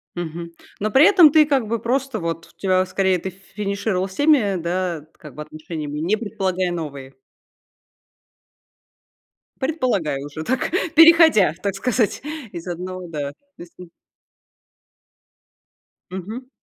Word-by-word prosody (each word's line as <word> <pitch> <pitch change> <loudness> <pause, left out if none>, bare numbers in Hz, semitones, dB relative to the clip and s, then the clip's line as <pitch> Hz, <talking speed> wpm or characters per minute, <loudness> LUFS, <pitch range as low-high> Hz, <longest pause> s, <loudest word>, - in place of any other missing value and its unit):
Мгм. 170 0 -6 0.3
Но 215 +2 -1
при 265 +7 +6
этом 355 -6 +7
ты, 310 -1 +6
как 275 -6 +1
бы, 230 +1 -1
просто 260 +1 -1
вот, 165 -2 -4
у - - -50
тебя 185 -1 +2
скорее, 190 0 +1
ты 190 +3 -5
финишировала 195 0 -3
с 190 - -11
теми, 265 -8 +3
да, 170 -2 -2
как 150 -5 -13
бы 150 - -6
отношениями, 155 -1 -7
не 175 +8 +1
предполагая 190 -4 -2
новые. 140 -5 -6 2.5
Предполагая 245 - -1
уже 145 +2 -7
так, 255 +5 -1 0.2
переходя, 325 - +7
так 200 -2 -1
сказать, 230 +2 0 0.3
из 170 -1 -8
одного, 180 +1 -6
да, 145 -3 -4
то - - -31 0.2
есть, 175 - -12
м 180 -2 -11 2.2
Мгм. 215 +8 -7
185 Hz, 130 wpm, -21 LUFS, 165-230 Hz, 2.5 s, этом